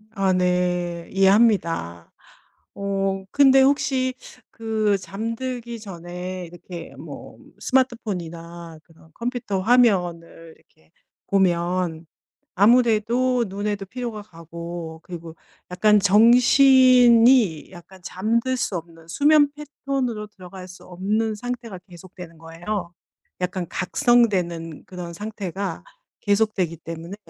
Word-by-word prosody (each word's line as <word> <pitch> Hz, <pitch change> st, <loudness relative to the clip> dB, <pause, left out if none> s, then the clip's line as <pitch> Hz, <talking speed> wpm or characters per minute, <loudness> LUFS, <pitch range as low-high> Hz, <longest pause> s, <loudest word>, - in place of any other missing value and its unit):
아 195 Hz, -2 st, +1 dB
네. 180 Hz, -1 st, -1 dB
이해합니다. 190 Hz, -, +2 dB, 0.6 s
어. 195 Hz, -1 st, -2 dB
근데 270 Hz, -1 st, +5 dB
혹시 265 Hz, -2 st, +1 dB, 0.4 s
그 220 Hz, -3 st, 0 dB
잠들기 230 Hz, +4 st, -5 dB
전에 180 Hz, -1 st, -7 dB
이렇게 175 Hz, 0 st, -10 dB
뭐 -, -, -11 dB, 0.2 s
스마트폰이나 170 Hz, -, -3 dB
그런 160 Hz, -1 st, -22 dB
컴퓨터 235 Hz, -5 st, -3 dB
화면을 180 Hz, -8 st, +1 dB
이렇게 80 Hz, 0 st, -31 dB, 0.4 s
보면 175 Hz, -3 st, 0 dB, 0.5 s
아무래도 240 Hz, +3 st, +3 dB
눈에도 200 Hz, +1 st, -4 dB
피로가 235 Hz, 0 st, -6 dB
가고 170 Hz, -2 st, -9 dB
그리고 170 Hz, -2 st, -9 dB, 0.4 s
약간 210 Hz, +3 st, +4 dB
정신이 245 Hz, -, +5 dB
약간 190 Hz, +1 st, -14 dB
잠들 230 Hz, +8 st, -1 dB
수 240 Hz, -7 st, -2 dB
없는, 165 Hz, -1 st, -12 dB
수면 290 Hz, -, +4 dB
패턴으로 275 Hz, -6 st, -4 dB
들어갈 185 Hz, -2 st, -12 dB
수 180 Hz, -, -14 dB
없는 210 Hz, +5 st, -2 dB
상태가 235 Hz, -4 st, -6 dB
계속되는 175 Hz, -1 st, -12 dB
거예요. 175 Hz, +3 st, -6 dB, 0.5 s
약간 180 Hz, -1 st, -3 dB
각성되는 180 Hz, -7 st, 0 dB
그런 180 Hz, -2 st, -8 dB
상태가 195 Hz, -2 st, -5 dB, 0.4 s
계속되기 200 Hz, -5 st, 0 dB
때문에 165 Hz, +3 st, -8 dB
195 Hz, 235 characters per minute, -22 LUFS, 175-230 Hz, 0.6 s, 근데